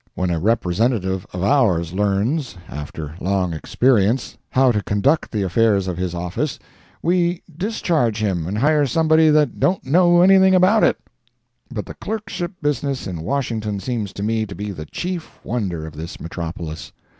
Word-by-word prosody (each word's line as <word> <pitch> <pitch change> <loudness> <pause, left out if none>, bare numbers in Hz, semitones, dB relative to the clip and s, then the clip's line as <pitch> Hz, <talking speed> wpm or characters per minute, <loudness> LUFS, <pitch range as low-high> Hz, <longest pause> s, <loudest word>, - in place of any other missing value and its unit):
When 90 -1 -1
a 85 - 0
representative 95 -1 0
of 90 0 -4
ours 95 - +2
learns, 105 - 0
after 75 0 -7
long 95 -2 0
experience, 115 - +1
how 130 -1 +4
to 105 -3 0
conduct 130 +11 +1
the 105 -3 -1
affairs 100 0 +2
of 90 -2 -3
his 90 -1 -2
office, 90 - -3 0.5
we 175 0 +1
discharge 165 - 0
him 95 -7 -1
and 100 +3 -3
hire 145 +3 +3
somebody 160 +3 +4
that 150 -1 +2
don't 185 -5 +1
know 175 +4 +5
anything 190 0 +6
about 190 +4 +4
it. - - +4 0.7
But 115 -6 -5
the - - -8
clerkship 200 -4 -5
business 140 -2 -1
in 85 -4 -5
Washington 110 -3 -2
seems 105 -1 -3
to 100 - -5
me 110 0 0
to 100 - -8
be 105 0 -4
the 75 -5 -7
chief 180 - -5
wonder 95 -9 -3
of 80 -1 -9
this 80 +2 -7
metropolis. 85 -1 -6
110 Hz, 160 wpm, -21 LUFS, 90-150 Hz, 0.7 s, anything